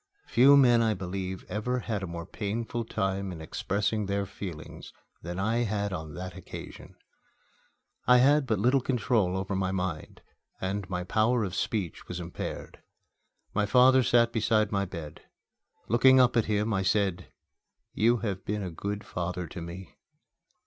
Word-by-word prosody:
Few 140 +4 +6
men, 120 -4 +6
I 110 -2 +2
believe, 95 0 -5
ever 125 +4 -2
had 110 -4 -3
a 95 - -4
more 85 0 -6
painful 115 +4 -3
time 95 -2 -2
in 85 - -8
expressing 100 +6 -2
their 100 0 -1
feelings 90 -5 -8 0.3
than 85 +1 -6
I 110 +4 0
had 105 -4 -1
on 80 -3 -6
that 90 0 -6
occasion. - - -10 1.1
I 125 - +7
had 140 +2 +4
but 110 -3 +1
little 125 +7 +3
control 110 -7 +1
over 95 +1 -3
my 95 -1 0
mind, 90 -5 -4 0.4
and 95 0 -3
my 90 -1 -2
power 110 +5 +2
of 95 -3 -3
speech 95 -4 -3
was 90 - -5
impaired. 85 0 -6 0.7
My 105 0 +1
father 130 +3 +6
sat 115 -1 +3
beside 110 -1 +2
my 100 -1 0
bed. 85 -5 -8 0.7
Looking 130 +4 +6
up 125 -1 +4
at 115 - +3
him, 105 +1 0
I 95 - +1
said, 95 -2 0 0.6
"You 115 +3 +3
have 95 -3 -3
been 105 0 -2
a 90 - -4
good 100 +5 -4
father 90 -1 -4
to 85 +1 -8
me." 85 +2 -9
100 Hz, 160 wpm, -28 LUFS, 90-115 Hz, 1.1 s, I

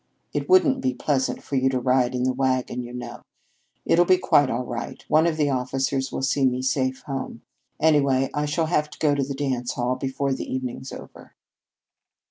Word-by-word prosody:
It - - -3
wouldn't 285 -8 +4
be 260 0 0
pleasant 135 -3 -1
for 140 - -4
you 130 0 +3
to 130 -1 0
ride 125 0 +2
in 125 - -1
the 130 0 +1
wagon, 130 -1 -1
you 120 0 -8
know. 125 0 -7 0.7
I'll 175 - +5
be 185 +1 +4
quite 145 -6 +3
all 125 +1 -2
right. 120 -1 -6
One 160 +2 +4
of 160 -2 -1
the 145 -2 +1
officers 130 +1 -1
will - - -4
see 135 +1 +1
me 130 -1 +1
safe 130 0 -1
home. 135 -4 -5 0.4
Anyway, 140 -4 +3
I 150 0 -1
shall 160 +3 0
have 150 -2 0
to - - -13
go 150 -2 +2
to 140 - 0
the 135 +1 -3
dance 130 -3 -2
hall 125 +1 -1
before 135 +1 -2
the - - -5
evening's 130 0 -4
over." - - -12
135 Hz, 200 wpm, -24 LUFS, 130-145 Hz, 0.7 s, I'll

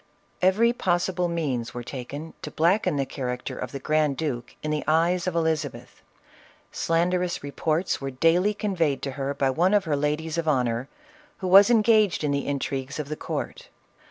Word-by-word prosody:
Every 210 +6 +4
possible 180 -3 0
means 135 -9 -2
were 120 - -4
taken 140 +6 -7
to - - -5
blacken 170 +4 +2
the 140 -1 0
character 125 -2 -4
of 125 - -5
the - - -5
grand 150 0 +1
duke 130 -7 -4
in 155 - -2
the 150 -1 -1
eyes 170 +3 +2
of 180 - -1
Elizabeth. 160 -4 -2 0.7
Slanderous 175 +1 0
reports 155 +5 -1
were 135 - -3
daily 165 +10 +2
conveyed 170 -9 -1
to 135 - -2
her 140 +1 -3
by 135 -1 +1
one 180 +8 +2
of 205 - +3
her 155 -4 0
ladies 150 +3 -1
of 165 - -3
honor, 125 -3 0 0.5
who 185 - -4
was 195 +3 +8
engaged 215 -6 +4
in 150 - +1
the 140 0 -1
intrigues 140 -1 -3
of 150 -2 -5
the 155 - -3
court. - - -5
155 Hz, 175 wpm, -25 LUFS, 140-180 Hz, 0.7 s, was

